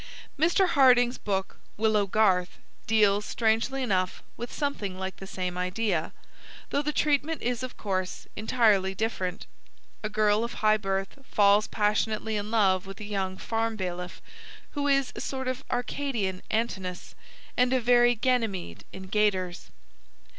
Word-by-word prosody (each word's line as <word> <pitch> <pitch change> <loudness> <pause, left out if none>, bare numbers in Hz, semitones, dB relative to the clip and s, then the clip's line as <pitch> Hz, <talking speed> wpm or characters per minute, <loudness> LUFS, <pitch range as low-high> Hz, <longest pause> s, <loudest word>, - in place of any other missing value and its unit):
Mr. 345 +5 +3
Hardinge's 255 -5 +5
book 195 -1 -2 0.2
Willow 215 -2 +2
Garth 190 -3 +2 0.3
deals, 210 -2 +4
strangely 230 +5 0
enough, 185 -5 -1
with 240 +1 -6
something 215 -11 -3
like 190 0 -5
the 195 - -9
same 180 -1 -4
idea, 180 -2 -1 0.6
though 285 - +2
the 300 +1 -1
treatment 300 +1 0
is, 245 0 -1
of 255 -1 -6
course, 185 -3 -3
entirely 210 -4 +2
different. 190 -3 -2 0.6
A 215 - -3
girl 215 0 +2
of 235 - -4
high 215 0 +3
birth 195 +4 -3
falls 205 -3 +4
passionately 215 +1 0
in 205 0 -3
love 195 -4 +2
with 195 0 -9
a - - -6
young 195 -2 -3
farm 225 +2 -1
bailiff 180 -3 -5 0.5
who 285 -1 -2
is 275 -2 +2
a - - -5
sort 265 -1 -4
of 255 +1 -3
Arcadian 240 -7 -2
Antinous 190 -5 -3 0.4
and 250 0 +3
a 260 - +3
very 240 0 +4
Ganymede 220 - -1
in 190 - -9
gaiters. 190 -3 0
215 Hz, 145 wpm, -27 LUFS, 190-245 Hz, 0.6 s, Hardinge's